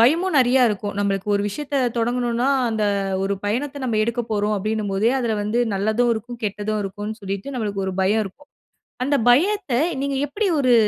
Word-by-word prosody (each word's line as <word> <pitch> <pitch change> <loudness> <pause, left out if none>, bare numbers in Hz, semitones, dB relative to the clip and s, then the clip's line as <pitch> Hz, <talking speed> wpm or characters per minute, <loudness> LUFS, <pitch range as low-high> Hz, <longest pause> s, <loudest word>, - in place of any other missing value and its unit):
பயமும் 325 +9 +3
நெறைய 255 0 +5
இருக்கும். 205 -1 -3
நம்மளுக்கு 200 0 -1
ஒரு 200 - +1
விஷயத்த 285 +6 -4 0.2
தொடங்கணும்னா 240 +2 0 0.2
அந்த 220 -2 0 0.4
ஒரு 200 +1 0
பயணத்த 270 +7 -2
நம்ம 225 -4 0
எடுக்கப் 235 +1 -2
போறோம் 210 0 +1
அப்டின்னும்போதே 215 +1 0
அதுல 235 -4 0
வந்து 215 +3 -1 0.2
நல்லதும் 220 +5 +1
இருக்கும். 235 +2 -7
கெட்டதும் 210 +1 -2
இருக்குன்னு 205 +3 -5
சொல்லிட்டு 200 +6 -5
நம்மளுக்கு 205 -5 -2
ஒரு 190 - -2
பயம் 210 +3 +2
இருக்கும். 280 +10 -12 0.6
அந்த 285 +1 +2
பயத்த 365 +4 +3 0.3
நீங்க 280 -1 -1
எப்படி 405 +8 -1
ஒரு 255 -3 +4
225 Hz, 165 wpm, -22 LUFS, 205-255 Hz, 0.6 s, நெறைய